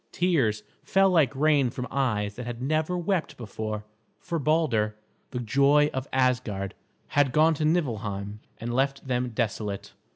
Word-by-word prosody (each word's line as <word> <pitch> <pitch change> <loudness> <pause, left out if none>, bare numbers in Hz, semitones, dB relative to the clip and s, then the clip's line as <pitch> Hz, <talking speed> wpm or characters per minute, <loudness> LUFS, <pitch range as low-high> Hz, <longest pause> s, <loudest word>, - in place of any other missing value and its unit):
Tears 135 -13 +1 0.2
fell 195 0 +3
like 150 -7 +3
rain 145 -2 +3
from 125 +1 -5
eyes 110 -7 0
that 125 -1 -6
had 120 -1 -5
never 155 +6 0
wept 175 0 -1
before, 110 -2 -5 0.3
for 170 -2 -3
Balder, 135 -9 +1 0.3
the 125 - -4
joy 140 +5 +3
of 130 +1 -3
Asgard, 125 -7 0 0.4
had 145 -2 +3
gone 155 +4 +4
to 155 0 -1
Niflheim 105 - -1 0.2
and 120 +1 -4
left 135 +2 0
them 125 -1 0
desolate. 105 -3 -3
130 Hz, 150 wpm, -27 LUFS, 110-155 Hz, 0.4 s, gone